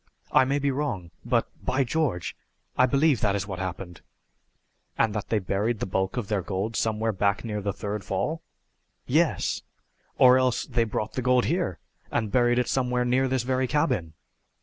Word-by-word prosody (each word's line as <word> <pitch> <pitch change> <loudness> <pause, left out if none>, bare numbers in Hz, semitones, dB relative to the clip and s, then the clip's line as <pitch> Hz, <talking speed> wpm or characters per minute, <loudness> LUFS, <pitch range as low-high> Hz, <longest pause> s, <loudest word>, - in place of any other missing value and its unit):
I 130 - +5
may 140 +2 +1
be 140 -1 +1
wrong, 130 - -3
but - - +1 0.2
by 135 +1 +1
George, 130 - -1 0.4
I 130 - +4
believe 140 -2 +3
that 100 -1 +2
is 100 -1 -2
what 95 -3 -6
happened!" 90 -1 -5 1.0
"And 110 - +2
that 105 - -4
they 110 - +2
buried 105 +4 -1
the - - -1
bulk 95 +3 -1
of 115 -5 -2
their 105 -2 0
gold 100 +5 -3
somewhere 110 0 0
back 100 +2 0
near 105 -2 -3
the 100 0 -1
third 105 +1 -4
fall?" 125 - -2 0.6
"Yes; - - +1 0.6
or 130 0 +7
else 130 -2 +1
they 120 -3 +1
brought 110 -1 -3
the 130 - -2
gold 125 0 +3
here 170 - 0 0.3
and 110 -4 -1
buried 120 0 +3
it 125 - +1
somewhere 125 -2 0
near 130 +2 +2
this 130 -2 0
very 130 +1 0
cabin!" 115 - 0
115 Hz, 180 wpm, -26 LUFS, 100-130 Hz, 1.0 s, or